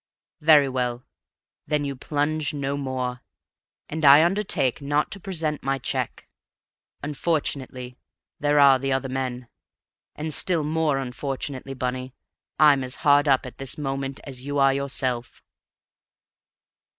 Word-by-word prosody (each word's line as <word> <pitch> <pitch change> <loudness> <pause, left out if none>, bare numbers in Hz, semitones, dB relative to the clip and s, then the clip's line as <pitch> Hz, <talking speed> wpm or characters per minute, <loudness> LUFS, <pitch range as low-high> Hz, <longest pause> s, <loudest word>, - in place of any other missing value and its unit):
Very 150 -2 +6
well, 125 -2 -2 0.6
then 150 -1 0
you 140 -1 -3
plunge 150 +2 -1
no 140 -1 -2
more, 130 -3 -3 0.7
and 160 +1 -5
I 145 +2 +8
undertake 175 - +1
not 145 +1 0
to 195 - -5
present 165 -6 -3
my 135 +1 0
check. 135 - -3 0.8
Unfortunately 140 -4 -2 0.4
there 145 0 +2
are 140 -2 +7
the 135 +1 -2
other 135 0 -1
men; 130 -2 -3 0.7
and 155 +1 -4
still 170 -1 +2
more 155 -1 +1
unfortunately, 135 +1 -5
Bunny, 130 0 -4 0.4
I'm 145 -3 +5
as 125 0 -4
hard 145 0 +5
up 135 -2 +3
at 125 - -10
this 135 -1 -5
moment 135 -1 -3
as 130 -2 -6
you 145 +1 -3
are 135 -1 +5
yourself!" 130 -3 -2
140 Hz, 130 wpm, -24 LUFS, 130-150 Hz, 0.8 s, I